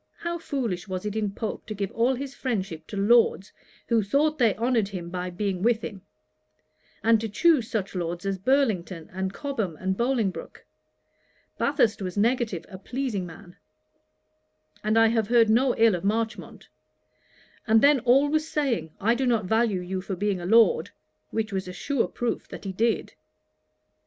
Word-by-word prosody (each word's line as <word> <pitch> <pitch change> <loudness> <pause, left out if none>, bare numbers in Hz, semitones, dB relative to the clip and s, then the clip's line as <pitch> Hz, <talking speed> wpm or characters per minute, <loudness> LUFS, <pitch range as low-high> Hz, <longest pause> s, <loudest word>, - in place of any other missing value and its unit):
How 340 0 -4
foolish 235 - -3
was 185 +1 -4
it 210 0 -3
in 215 -2 0
Pope 215 +2 -5
to 215 - -5
give 200 -1 -3
all 240 +3 +1
his 275 +1 -6
friendship 190 - -3
to 205 - -6
Lords, 205 -1 +3 0.3
who 230 -2 +3
thought 290 +9 +1
they 230 -5 +4
honoured 230 -2 +1
him 180 -4 -7
by 180 0 -3
being 185 0 -3
with 230 +1 +2
him; 195 -2 -6 1.0
and 225 -1 +4
to 225 - -3
choose 260 - +3
such 210 -5 -2
Lords 175 0 -4
as 195 -1 -2
Burlington, 195 - 0
and 190 0 -2
Cobham, 225 - -3
and 190 +2 -1
Bolingbroke! 235 -4 -2 0.9
Bathurst 230 -7 +2
was 185 0 -4
negative, 225 -4 0
a 185 -2 -10
pleasing 225 -4 -3
man; 175 +2 -13 1.3
and 215 +1 +1
I 225 - +6
have 225 -2 +1
heard 230 -2 +4
no 250 +3 +3
ill 225 -1 +5
of 175 - -3
Marchmont; 220 +2 -3 1.0
and 220 +1 +5
then 285 -1 +6
always 285 +6 +3
saying, 235 - -1
"I 225 +4 +3
do 260 +2 0
not 230 -5 +1
value 220 -2 +1
you 185 +1 -4
for 195 0 -4
being 195 -1 -1
a 175 - -4
Lord;" 230 - +4 0.4
which 220 -1 -2
was 190 -1 -2
a 180 - -6
sure 280 +5 -1
proof 240 -1 -3
that - - -9
he 195 - -4
did. 225 +5 0
220 Hz, 170 wpm, -26 LUFS, 190-240 Hz, 1.3 s, I